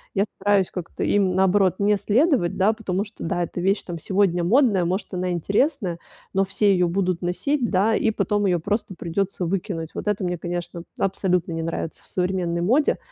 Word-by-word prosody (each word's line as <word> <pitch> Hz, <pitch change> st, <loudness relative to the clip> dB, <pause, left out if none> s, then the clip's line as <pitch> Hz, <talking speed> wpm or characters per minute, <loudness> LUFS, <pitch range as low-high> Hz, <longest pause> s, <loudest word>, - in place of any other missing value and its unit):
Я 195 Hz, -, +3 dB
стараюсь 200 Hz, -1 st, +2 dB
как-то 180 Hz, -2 st, -5 dB
им, 195 Hz, -3 st, +2 dB
наоборот, 190 Hz, 0 st, +3 dB
не 205 Hz, +1 st, +3 dB
следовать, 215 Hz, -, +2 dB
да, 200 Hz, +3 st, +3 dB
потому 200 Hz, -3 st, -2 dB
что, 205 Hz, -, -11 dB
да, 175 Hz, 0 st, -1 dB
эта 175 Hz, -, -5 dB
вещь 195 Hz, +3 st, +1 dB
там 170 Hz, -2 st, -6 dB
сегодня 185 Hz, -1 st, +1 dB
модная, 210 Hz, -2 st, +3 dB
может, 185 Hz, +4 st, -2 dB
она 180 Hz, 0 st, -1 dB
интересная, 195 Hz, -, 0 dB, 0.3 s
но 195 Hz, 0 st, +3 dB
все 200 Hz, +1 st, +2 dB
её 180 Hz, -2 st, +2 dB
будут 185 Hz, -1 st, 0 dB
носить, 240 Hz, +9 st, 0 dB
да, 210 Hz, +4 st, +3 dB
и 225 Hz, -, +2 dB
потом 205 Hz, -1 st, 0 dB
её 175 Hz, -2 st, +2 dB
просто 205 Hz, +2 st, -2 dB
придётся 180 Hz, +2 st, -2 dB
выкинуть. 170 Hz, -2 st, -3 dB
Вот -, -, -5 dB
это 210 Hz, -1 st, 0 dB
мне, 180 Hz, -1 st, -2 dB
конечно, 175 Hz, -1 st, -5 dB, 0.2 s
абсолютно 180 Hz, -3 st, 0 dB
не 165 Hz, -, -3 dB
нравится 165 Hz, 0 st, -4 dB
в -, -, -13 dB
современной 180 Hz, -2 st, -1 dB
моде, 255 Hz, -, +2 dB
190 Hz, 190 wpm, -23 LUFS, 175-205 Hz, 0.3 s, Я